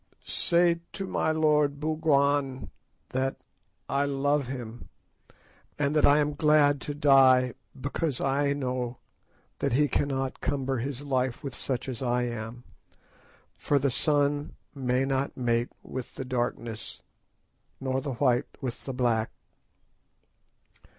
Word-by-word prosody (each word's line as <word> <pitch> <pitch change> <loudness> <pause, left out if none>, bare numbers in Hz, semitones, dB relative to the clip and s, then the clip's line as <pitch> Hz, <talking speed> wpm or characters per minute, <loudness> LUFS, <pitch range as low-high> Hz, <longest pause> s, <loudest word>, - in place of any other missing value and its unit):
"Say 170 -1 +3
to 195 - -4
my 170 - 0
lord, 150 -2 +2
Bougwan, 145 -3 +1 0.4
that—I 135 +1 -3
love 140 0 +1
him, 120 -3 -7 0.9
and 145 +1 0
that 150 - +5
I 145 - +6
am 150 0 +1
glad 145 -1 +4
to 145 - -4
die 130 -3 +5 0.3
because 145 +1 -2
I 140 +1 +1
know 125 -3 -3 0.6
that - - 0
he 145 +3 +4
cannot 135 -2 -1
cumber 135 -1 -1
his 135 +2 -4
life 130 -2 -1
with 135 -3 -5
such 125 0 -3
as 130 -2 -5
I 125 -1 +1
am, 120 0 -5 0.9
for 145 - 0
the 140 0 +1
sun 145 +1 +1 0.2
may 130 -1 0
not 135 0 -1
mate 120 -1 0
with 130 -2 -7
the 130 - -5
darkness, 120 -3 -3 0.8
nor 130 0 -1
the 140 -2 -3
white 125 0 +2
with 125 -3 -5
the 135 - -4
black. 115 -3 +1
135 Hz, 125 wpm, -28 LUFS, 125-145 Hz, 0.9 s, I